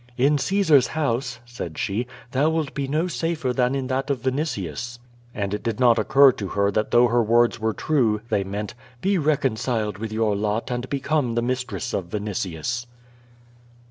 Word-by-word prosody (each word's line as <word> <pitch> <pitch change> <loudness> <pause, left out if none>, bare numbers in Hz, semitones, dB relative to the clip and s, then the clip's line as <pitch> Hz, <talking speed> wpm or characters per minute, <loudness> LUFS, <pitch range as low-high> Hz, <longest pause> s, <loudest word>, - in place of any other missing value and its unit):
"In 140 +3 +3
Caesar's 160 -6 +4
house," 130 -5 -1
said 115 -10 -7
she, 110 +5 -1 0.2
"thou 140 +4 +2
wilt 160 -3 -1
be 140 -1 -2
no 155 +5 0
safer 165 -6 -1
than 125 +1 +1
in 135 -1 -2
that 130 +2 -2
of 130 -4 -1
Vinitius." 120 - -2 0.4
And 100 -1 -2
it 105 - -2
did 115 -1 -3
not 120 -2 +5
occur 140 0 +6
to 105 -5 -5
her 100 +2 +1
that 105 +2 0
though 120 +1 +5
her 120 +1 +3
words 115 +1 +3
were 110 0 0
true, 120 -9 +1
they 100 - +1
meant: 100 +2 -5 0.3
"Be 195 -1 +2
reconciled 120 - 0
with 110 0 -4
your 110 -1 +1
lot 105 +4 -1
and 125 +1 -3
become 140 -3 0
the 120 - +1
mistress 125 -6 -3
of 95 - -1
Vinitius." 105 +3 -3
120 Hz, 175 wpm, -24 LUFS, 105-140 Hz, 0.4 s, occur